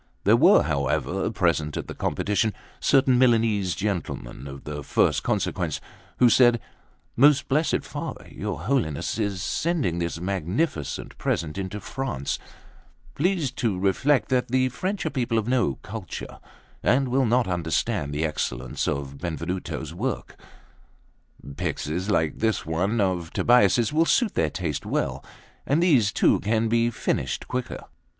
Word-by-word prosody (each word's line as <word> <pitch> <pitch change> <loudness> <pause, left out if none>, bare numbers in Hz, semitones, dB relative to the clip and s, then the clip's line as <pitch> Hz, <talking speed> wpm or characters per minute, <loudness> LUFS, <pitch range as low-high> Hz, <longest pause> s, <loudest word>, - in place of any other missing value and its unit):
There - - +5
were, - - +6
however, 75 +7 -1
present 85 -8 0
at - - -4
the - - -6
competition 105 +1 0 0.3
certain 130 -2 +4
Milanese 110 -7 +3
gentlemen 85 - -4
of 70 0 -9
the 75 -1 -6
first - - +2
consequence, - - -1 0.4
who 125 - +6
said: 120 0 +5 0.6
"Most 140 +2 +5
blessed 150 +4 +1
Father, - - -6
your - - -4
Holiness 105 - -1
is 100 -3 -1
sending 150 - 0
this 85 -1 -2
magnificent 90 - -2
present 80 -2 -1
into 95 +1 -4
France; 120 - -3 0.7
please 170 -4 0
to 115 -7 -1
reflect 120 +9 +2
that 130 -2 +1
the 130 +1 +2
French 185 - -3
are 160 - -1
people 120 -4 0
of 110 0 0
no 120 - +1
culture, - - -7 0.4
and 130 +1 +2
will 130 0 +2
not 120 0 +2
understand 80 -4 -1
the 75 +2 -1
excellence 65 -5 -2
of 70 0 -3
Benvenuto's 85 +2 -4
work; - - -3 1.2
pyxes 90 +7 -2
like 80 -6 +1
this 110 -3 0
one 95 +8 0
of 90 -4 0
Tobbia's 120 0 +4
will 160 +2 +4
suit 230 +4 +2
their 80 - +1
taste - - -3
well, - - -2 0.4
and 150 +5 +3
these 130 - +4
too - - +3
can 110 +1 0
be 115 +1 +3
finished 115 - -2
quicker. 125 -1 -4
105 Hz, 140 wpm, -25 LUFS, 85-125 Hz, 1.2 s, were